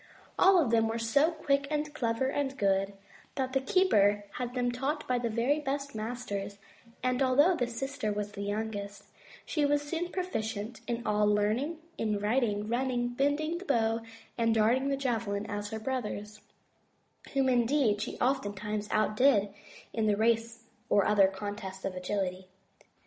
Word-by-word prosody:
All 380 Hz, 0 st, +7 dB
of 270 Hz, -9 st, +2 dB
them 225 Hz, -1 st, +4 dB
were 225 Hz, +1 st, -2 dB
so 230 Hz, +7 st, +3 dB
quick 280 Hz, -4 st, 0 dB
and 300 Hz, 0 st, -2 dB
clever 235 Hz, -3 st, 0 dB
and 275 Hz, 0 st, -2 dB
good 195 Hz, -1 st, +1 dB, 0.4 s
that 260 Hz, -2 st, -2 dB
the 270 Hz, -, +2 dB
keeper 205 Hz, -, +3 dB
had 245 Hz, 0 st, -4 dB
them 245 Hz, -1 st, +1 dB
taught 275 Hz, +5 st, -2 dB
by 250 Hz, -1 st, +1 dB
the 235 Hz, -1 st, -1 dB
very 240 Hz, +7 st, +1 dB
best 280 Hz, -1 st, -3 dB
masters, 215 Hz, -3 st, -4 dB, 0.5 s
and 255 Hz, +1 st, +1 dB
although 285 Hz, +7 st, +5 dB
the 245 Hz, -6 st, 0 dB
sister 250 Hz, -1 st, -3 dB
was 205 Hz, 0 st, -3 dB
the 200 Hz, -, -7 dB
youngest, 205 Hz, -1 st, -4 dB, 0.4 s
she 300 Hz, -, 0 dB
was 290 Hz, 0 st, +2 dB
soon 330 Hz, +4 st, -2 dB
as -, -, -8 dB
proficient 225 Hz, -, -3 dB
in 235 Hz, 0 st, -3 dB
all 210 Hz, 0 st, +2 dB
learning, 215 Hz, +10 st, +1 dB, 0.2 s
in 215 Hz, -2 st, 0 dB
riding, 210 Hz, -1 st, 0 dB
running, 245 Hz, +1 st, 0 dB
bending 290 Hz, +6 st, 0 dB
the 385 Hz, -, -10 dB
bow 225 Hz, -, +1 dB, 0.4 s
and 230 Hz, -1 st, +3 dB
darting 235 Hz, +5 st, +3 dB
the 275 Hz, -, 0 dB
javelin 225 Hz, -6 st, -1 dB
as 205 Hz, -1 st, -4 dB
her 220 Hz, 0 st, -4 dB
brothers, 215 Hz, -4 st, -4 dB, 0.9 s
whom 270 Hz, -1 st, +3 dB
indeed 240 Hz, -3 st, +2 dB
she 225 Hz, -, -4 dB
oftentimes 210 Hz, -4 st, -1 dB
outdid 215 Hz, -1 st, +3 dB, 0.4 s
in 220 Hz, -1 st, 0 dB
the 205 Hz, -1 st, +2 dB
race 230 Hz, +1 st, +1 dB, 0.3 s
or 200 Hz, -, +4 dB
other 205 Hz, -2 st, +5 dB
contest 190 Hz, 0 st, -6 dB
of 195 Hz, -, -2 dB
agility. 185 Hz, 0 st, -3 dB
230 Hz, 160 wpm, -30 LUFS, 210-270 Hz, 0.9 s, All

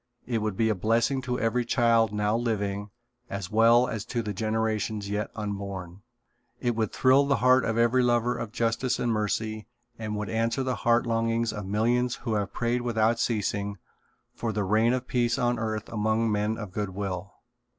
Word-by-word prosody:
It 120 Hz, -2 st, -1 dB
would 105 Hz, -2 st, -2 dB
be 110 Hz, -1 st, +2 dB
a -, -, +3 dB
blessing 115 Hz, +7 st, +1 dB
to 125 Hz, -1 st, -2 dB
every 115 Hz, +2 st, +1 dB
child 115 Hz, -2 st, +3 dB
now 105 Hz, +1 st, 0 dB
living, 105 Hz, -3 st, -2 dB, 0.4 s
as 100 Hz, -1 st, -5 dB
well 115 Hz, +3 st, +5 dB
as 110 Hz, -2 st, -4 dB
to 120 Hz, -2 st, -2 dB
the 105 Hz, -1 st, -3 dB
generations 110 Hz, -1 st, -1 dB
yet 105 Hz, 0 st, -1 dB
unborn. 100 Hz, -3 st, -5 dB, 0.6 s
It 120 Hz, -1 st, 0 dB
would 110 Hz, -2 st, -1 dB
thrill 135 Hz, +2 st, +4 dB
the 140 Hz, -, +3 dB
heart 125 Hz, +1 st, +4 dB
of 115 Hz, 0 st, -1 dB
every 120 Hz, +2 st, +4 dB
lover 120 Hz, 0 st, +2 dB
of 115 Hz, -, -5 dB
justice 115 Hz, +2 st, 0 dB
and 120 Hz, -, 0 dB
mercy 110 Hz, 0 st, -2 dB, 0.3 s
and 110 Hz, -1 st, -3 dB
would 105 Hz, 0 st, -3 dB
answer 115 Hz, +4 st, 0 dB
the 130 Hz, -1 st, -1 dB
heart 120 Hz, +2 st, +2 dB
longings 115 Hz, 0 st, 0 dB
of 105 Hz, -3 st, -6 dB
millions 120 Hz, +4 st, +1 dB
who 115 Hz, -2 st, -4 dB
have 105 Hz, -2 st, -1 dB
prayed 120 Hz, +1 st, -1 dB
without 115 Hz, -1 st, +1 dB
ceasing 100 Hz, -3 st, -1 dB, 0.6 s
for 115 Hz, -, -3 dB
the 105 Hz, -1 st, -1 dB
reign 110 Hz, +4 st, +3 dB
of 130 Hz, 0 st, -2 dB
peace 120 Hz, -1 st, +1 dB
on 120 Hz, -2 st, +1 dB
earth 110 Hz, -1 st, -3 dB
among 110 Hz, +1 st, 0 dB
men 105 Hz, +1 st, 0 dB
of 105 Hz, -4 st, -7 dB
good 105 Hz, +1 st, -2 dB
will. 95 Hz, -1 st, -4 dB
110 Hz, 185 wpm, -27 LUFS, 105-120 Hz, 0.6 s, well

